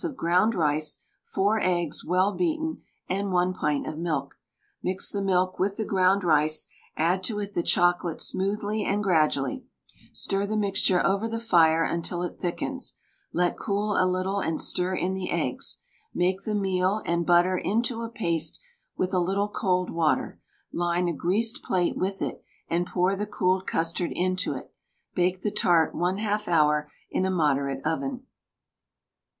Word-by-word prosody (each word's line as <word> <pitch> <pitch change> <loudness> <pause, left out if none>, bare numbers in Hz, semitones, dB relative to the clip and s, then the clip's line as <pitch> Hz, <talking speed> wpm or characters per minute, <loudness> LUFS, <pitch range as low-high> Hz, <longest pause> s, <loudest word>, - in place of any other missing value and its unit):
of 320 -6 -4
ground 180 +7 +2
rice, 155 -2 0 0.2
4 205 +3 +1
eggs, 175 -5 0
well 185 +4 +2
beaten, 320 -2 -1 0.3
and 195 +1 -1
1 180 0 +2
pint 150 -5 -1
of 155 - -5
milk. 150 -5 -3 0.4
Mix 185 +1 -1
the 200 - -2
milk 185 -1 +1
with 200 +1 0
the 220 - -2
ground 190 0 +3
rice, 155 -2 +2 0.3
add 175 +4 +1
to 215 0 0
it 205 -1 -4
the - - +1
chocolate 175 -1 +2
smoothly 205 +2 -1
and 205 +1 0
gradually; 160 - +1 0.5
stir 195 0 +1
the 215 +1 -1
mixture 195 -3 +2
over 200 +3 +1
the 230 0 -3
fire 165 -7 +4
until 170 +1 -2
it 175 - -5
thickens, 175 -2 -3 0.4
let 175 0 0
cool 205 +1 -1
a 185 - +3
little 185 +2 0
and 165 -4 -1
stir 185 +1 0
in 185 +1 -1
the 190 -1 -4
eggs; - - -2 0.3
make 185 +2 0
the 215 - -1
meal 190 +1 +1
and 170 0 0
butter 175 +1 +4
into 230 +3 0
a 230 - -4
paste 170 -9 -1 0.4
with 185 +1 -1
a 185 - +3
little 195 +4 0
cold 180 -3 0
water; 165 -2 0 0.3
line 175 +1 0
a 170 - 0
greased 205 +9 0
plate 180 -2 0
with 195 +1 -2
it, - - -4 0.2
and 175 +1 0
pour 185 +2 +1
the 210 +2 -3
cooled 185 -2 0
custard 165 +2 0
into 185 +1 0
it; - - -9 0.4
bake 180 0 0
the 210 - 0
tart 175 -8 +3
1/2 205 +4 -1
hour 150 -3 +3 0.2
in - - 0
a 190 - +1
moderate 140 -6 0
oven. 250 +11 -2
185 Hz, 165 wpm, -26 LUFS, 170-200 Hz, 0.5 s, fire